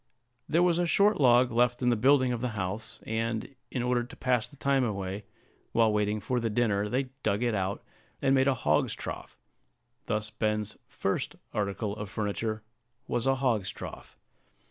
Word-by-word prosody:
There 170 Hz, +3 st, +4 dB
was 175 Hz, -1 st, +3 dB
a 175 Hz, -, +2 dB
short 200 Hz, +4 st, +4 dB
log 125 Hz, -1 st, +5 dB
left 120 Hz, +2 st, +2 dB
in 125 Hz, -, +4 dB
the -, -, +3 dB
building 130 Hz, +2 st, +4 dB
of 120 Hz, -, -3 dB
the 120 Hz, -4 st, -3 dB
house, 105 Hz, +4 st, -4 dB
and, 110 Hz, +3 st, -2 dB, 0.2 s
in 125 Hz, -, -2 dB
order 125 Hz, -1 st, +1 dB
to 120 Hz, -, -11 dB
pass 125 Hz, -3 st, +1 dB
the 145 Hz, -, -17 dB
time 140 Hz, -1 st, +2 dB
away, 100 Hz, -2 st, -3 dB, 0.5 s
while 115 Hz, -2 st, +4 dB
waiting 105 Hz, 0 st, +1 dB
for 125 Hz, +4 st, -1 dB
the 115 Hz, -1 st, -1 dB
dinner, 105 Hz, -2 st, +1 dB
they 130 Hz, +2 st, -1 dB
dug 105 Hz, +2 st, +1 dB
it 120 Hz, -2 st, +1 dB
out, 95 Hz, 0 st, -2 dB, 0.4 s
and 135 Hz, -, +2 dB
made 135 Hz, 0 st, +4 dB
a 135 Hz, -, +3 dB
hog's -, -, +1 dB
trough: -, -, -7 dB, 0.7 s
thus 105 Hz, 0 st, -2 dB
Ben's 105 Hz, -1 st, -1 dB
first -, -, -2 dB, 0.2 s
article 100 Hz, 0 st, -2 dB
of 105 Hz, -2 st, -6 dB
furniture 110 Hz, +1 st, -2 dB, 0.4 s
was 120 Hz, +2 st, -1 dB
a 135 Hz, -, +4 dB
hog's 120 Hz, -8 st, +1 dB
trough. -, -, -9 dB
115 Hz, 180 wpm, -29 LUFS, 105-130 Hz, 0.7 s, log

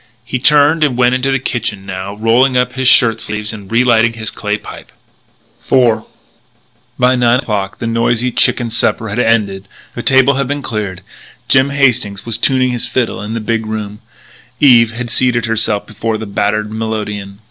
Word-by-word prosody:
He 130 Hz, -, -3 dB
turned 150 Hz, +3 st, +4 dB
and 135 Hz, -5 st, 0 dB
went 125 Hz, 0 st, +3 dB
into 130 Hz, +2 st, 0 dB
the 135 Hz, -, +2 dB
kitchen 115 Hz, -6 st, -4 dB
now, 95 Hz, +1 st, -6 dB
rolling 120 Hz, +4 st, +2 dB
up 125 Hz, -, 0 dB
his 130 Hz, -1 st, -1 dB
shirt 115 Hz, -3 st, +4 dB
sleeves 105 Hz, 0 st, -3 dB
and 100 Hz, -2 st, -11 dB
relighting 115 Hz, -1 st, +3 dB
his 110 Hz, -1 st, -5 dB
clay 105 Hz, 0 st, -3 dB
pipe. -, -, -12 dB, 0.8 s
IV 120 Hz, -4 st, +3 dB, 0.9 s
By 125 Hz, +1 st, +3 dB
nine 120 Hz, -1 st, +3 dB
o'clock 100 Hz, -6 st, -3 dB
the -, -, -5 dB
noisy 115 Hz, +2 st, 0 dB
chicken 120 Hz, -1 st, +1 dB
supper 110 Hz, -1 st, +1 dB
had 105 Hz, +4 st, -3 dB
ended; 105 Hz, -5 st, 0 dB, 0.3 s
the -, -, -5 dB
table 135 Hz, 0 st, +4 dB
had 140 Hz, -2 st, -1 dB
been 145 Hz, +1 st, -3 dB
cleared; 100 Hz, -5 st, -4 dB, 0.4 s
Jim 135 Hz, +1 st, +3 dB
Hastings 125 Hz, -8 st, 0 dB
was 115 Hz, -1 st, -1 dB
tuning 130 Hz, 0 st, +1 dB
his 120 Hz, -1 st, -2 dB
fiddle 125 Hz, -6 st, -2 dB
in 105 Hz, +2 st, -5 dB
the -, -, -2 dB
big 115 Hz, 0 st, -2 dB
room; 105 Hz, -1 st, -5 dB, 0.6 s
Eve 120 Hz, -5 st, +5 dB
had 120 Hz, 0 st, -6 dB
seated 120 Hz, -2 st, +2 dB
herself 110 Hz, -2 st, 0 dB
before 110 Hz, 0 st, -3 dB
the 110 Hz, -, -6 dB
battered 105 Hz, +1 st, -1 dB
melodeon. 105 Hz, -3 st, -4 dB
115 Hz, 175 wpm, -14 LUFS, 105-125 Hz, 0.9 s, Eve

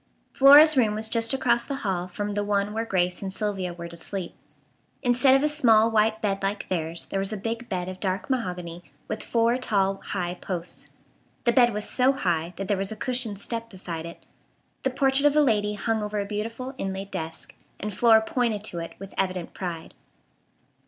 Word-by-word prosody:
Flora's 290 Hz, +3 st, +8 dB
room 220 Hz, -5 st, +3 dB
was 220 Hz, +1 st, -1 dB
just 230 Hz, 0 st, +2 dB
across 240 Hz, -3 st, +2 dB
the 280 Hz, -, -4 dB
hall 180 Hz, -2 st, -1 dB
from 205 Hz, +3 st, -4 dB
the 205 Hz, 0 st, -1 dB
one 205 Hz, 0 st, 0 dB
where 225 Hz, +1 st, -2 dB
Grace 180 Hz, -2 st, 0 dB
and 195 Hz, -1 st, -4 dB
Sylvia 195 Hz, -3 st, -2 dB
were 170 Hz, 0 st, -7 dB
to 170 Hz, -, -11 dB
sleep. 180 Hz, +1 st, -5 dB, 0.7 s
Instead 255 Hz, +2 st, +5 dB
of 270 Hz, -, +2 dB
a -, -, +4 dB
small 230 Hz, -7 st, +4 dB
white 220 Hz, 0 st, +2 dB
bed 195 Hz, -2 st, 0 dB
like 200 Hz, +1 st, -2 dB
theirs 165 Hz, -2 st, -3 dB
there 195 Hz, -, 0 dB
was 195 Hz, +1 st, -1 dB
a 215 Hz, -, -3 dB
big 230 Hz, +4 st, -4 dB
bed 180 Hz, -2 st, -2 dB
of 185 Hz, 0 st, -7 dB
dark 190 Hz, -1 st, -2 dB
mahogany 180 Hz, -9 st, -3 dB, 0.2 s
with -, -, -4 dB
four 235 Hz, +1 st, +1 dB
tall, 195 Hz, -5 st, +1 dB
high 180 Hz, -3 st, -3 dB
posts. 180 Hz, -1 st, -5 dB, 0.5 s
The 240 Hz, -, +3 dB
bed 240 Hz, 0 st, +5 dB
was 210 Hz, 0 st, -1 dB
so 260 Hz, +1 st, +3 dB
high 175 Hz, -8 st, -1 dB
that 195 Hz, +1 st, -5 dB
there 205 Hz, -, +1 dB
was 195 Hz, +1 st, -1 dB
a -, -, -4 dB
cushioned 240 Hz, -2 st, -1 dB
step 230 Hz, +2 st, -4 dB
beside 170 Hz, -5 st, -6 dB
it. 170 Hz, -, -12 dB, 0.6 s
The 265 Hz, -, +1 dB
portrait 270 Hz, +2 st, +3 dB
of 290 Hz, -, +1 dB
a 300 Hz, -, +6 dB
lady 210 Hz, -6 st, +1 dB
hung 220 Hz, +2 st, -1 dB
over 210 Hz, 0 st, -3 dB
a 200 Hz, -, -2 dB
beautiful 230 Hz, +5 st, -4 dB
inlaid 195 Hz, 0 st, -4 dB
desk, 160 Hz, 0 st, -5 dB, 0.3 s
and 210 Hz, 0 st, -4 dB
Flora 225 Hz, +1 st, +5 dB
pointed 220 Hz, -3 st, -1 dB
to 175 Hz, -5 st, -2 dB
it 165 Hz, -, -7 dB
with 195 Hz, 0 st, -10 dB
evident 185 Hz, -2 st, -2 dB
pride. 170 Hz, -3 st, -6 dB
210 Hz, 200 wpm, -25 LUFS, 185-235 Hz, 0.7 s, Flora's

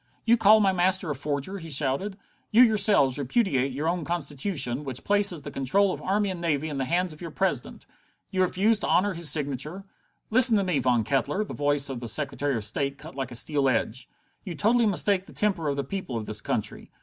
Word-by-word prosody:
"You 235 Hz, -, +5 dB
call 215 Hz, -1 st, +5 dB
my 195 Hz, -2 st, +3 dB
master 185 Hz, -2 st, +1 dB
a -, -, -3 dB
forger?" 145 Hz, +7 st, -4 dB
he 165 Hz, -1 st, -10 dB
shouted. 150 Hz, +8 st, 0 dB, 0.3 s
"You 235 Hz, +4 st, +6 dB
yourselves 200 Hz, -, +3 dB
repudiate 140 Hz, -, 0 dB
your 145 Hz, +5 st, -3 dB
own 175 Hz, 0 st, -1 dB
Constitution, 145 Hz, -4 st, -2 dB
which 130 Hz, -3 st, -5 dB
places 200 Hz, -6 st, +2 dB
the 145 Hz, -, -7 dB
control 190 Hz, +10 st, +1 dB
of -, -, -8 dB
army 200 Hz, +1 st, 0 dB
and 175 Hz, -2 st, -7 dB
navy 155 Hz, -2 st, -1 dB
in 145 Hz, -, -5 dB
the 135 Hz, -, -1 dB
hands 175 Hz, +2 st, -1 dB
of 155 Hz, -, -16 dB
your 170 Hz, -, -6 dB
President? 160 Hz, -7 st, -3 dB, 0.5 s
You 185 Hz, -, 0 dB
refuse 200 Hz, +4 st, +2 dB
to -, -, -3 dB
honor 200 Hz, +2 st, +2 dB
his 170 Hz, -2 st, +1 dB
signature?" 150 Hz, +5 st, -2 dB, 0.5 s
"Listen 240 Hz, -1 st, +7 dB
to 200 Hz, -, +1 dB
me, 180 Hz, -6 st, 0 dB
Mr. -, -, -4 dB
Von 120 Hz, -3 st, +2 dB
Kettler!" 140 Hz, -, -1 dB
The -, -, -8 dB
voice 145 Hz, -1 st, 0 dB
of 130 Hz, -3 st, -5 dB
the 120 Hz, -, -6 dB
Secretary 140 Hz, +1 st, -1 dB
of 110 Hz, -, -3 dB
State 140 Hz, +5 st, -2 dB
cut 155 Hz, +3 st, -11 dB
like 135 Hz, -2 st, -5 dB
a 120 Hz, -, -6 dB
steel 140 Hz, +2 st, +1 dB
edge. 120 Hz, 0 st, -2 dB, 0.3 s
"You 180 Hz, -5 st, -7 dB
totally 225 Hz, +6 st, +2 dB
mistake 195 Hz, -1 st, 0 dB
the -, -, -14 dB
temper 195 Hz, -7 st, -1 dB
of 140 Hz, -, -1 dB
the 140 Hz, -, -2 dB
people 135 Hz, -5 st, -5 dB
of 110 Hz, -, -5 dB
this 110 Hz, 0 st, -2 dB
country. -, -, -4 dB
155 Hz, 220 wpm, -26 LUFS, 140-195 Hz, 0.5 s, Listen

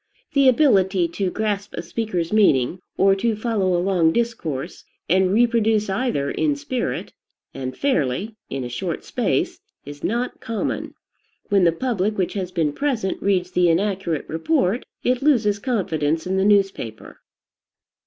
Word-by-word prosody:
The 275 Hz, -2 st, +5 dB
ability 195 Hz, -, +3 dB
to 190 Hz, +2 st, -2 dB
grasp 205 Hz, 0 st, -2 dB
a -, -, -4 dB
speaker's 180 Hz, -3 st, -3 dB
meaning, 180 Hz, -, +3 dB, 0.2 s
or 195 Hz, 0 st, +5 dB
to 225 Hz, +2 st, 0 dB
follow 205 Hz, -5 st, 0 dB
a 175 Hz, -, 0 dB
long 175 Hz, -4 st, +3 dB
discourse, 180 Hz, -, -3 dB, 0.2 s
and 185 Hz, +2 st, +3 dB
reproduce 220 Hz, -2 st, +2 dB
either 195 Hz, -, -1 dB
in 300 Hz, -2 st, +1 dB
spirit, 280 Hz, -4 st, -3 dB, 0.4 s
and 130 Hz, -1 st, -5 dB
fairly, 205 Hz, -, 0 dB
in 135 Hz, -1 st, -3 dB
a -, -, -4 dB
short 120 Hz, 0 st, -4 dB
space, -, -, -1 dB, 0.3 s
is 145 Hz, 0 st, -10 dB
not 240 Hz, +4 st, -2 dB
common. 225 Hz, -1 st, -3 dB, 0.5 s
When 195 Hz, -3 st, +4 dB
the 170 Hz, -, +5 dB
public 210 Hz, +1 st, -1 dB
which 185 Hz, -2 st, 0 dB
has 185 Hz, -3 st, -3 dB
been 160 Hz, -5 st, 0 dB
present 240 Hz, -, -1 dB
reads 185 Hz, -2 st, +1 dB
the 180 Hz, -1 st, +3 dB
inaccurate 185 Hz, -3 st, 0 dB
report, 200 Hz, -, 0 dB, 0.2 s
it 250 Hz, 0 st, +1 dB
loses 225 Hz, -8 st, +3 dB
confidence 165 Hz, -, -1 dB
in 185 Hz, +1 st, -1 dB
the 190 Hz, 0 st, +2 dB
newspaper. 195 Hz, -, 0 dB
195 Hz, 145 wpm, -22 LUFS, 170-230 Hz, 0.5 s, The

